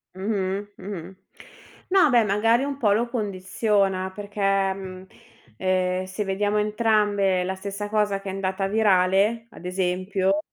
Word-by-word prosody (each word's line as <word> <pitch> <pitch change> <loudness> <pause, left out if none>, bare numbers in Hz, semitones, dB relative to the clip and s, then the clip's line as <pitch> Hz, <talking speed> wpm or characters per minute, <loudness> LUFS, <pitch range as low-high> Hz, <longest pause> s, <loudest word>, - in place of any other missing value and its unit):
Mh-mh, 195 0 -2
mh-mh 190 -1 -7 0.7
no, 370 -5 +5
beh, 240 -3 +5
magari 225 +5 +2
un 280 -1 -3
po' 220 -7 +2
lo 235 +3 0
condiziona, 195 -3 0
perché 205 0 -8 0.3
mhmm 190 -1 -9 0.5
ehm 185 +1 0
se 185 +3 -4
vediamo 205 +2 0
entrambe 210 -3 +2
la 185 +1 -2
stessa 200 +2 -5
cosa 210 -2 +1
che 195 - -6
è - - -3
andata 195 0 -2
virale, 205 +1 +2
ad - - -13
esempio, 185 +2 0
200 Hz, 135 wpm, -24 LUFS, 190-210 Hz, 0.7 s, no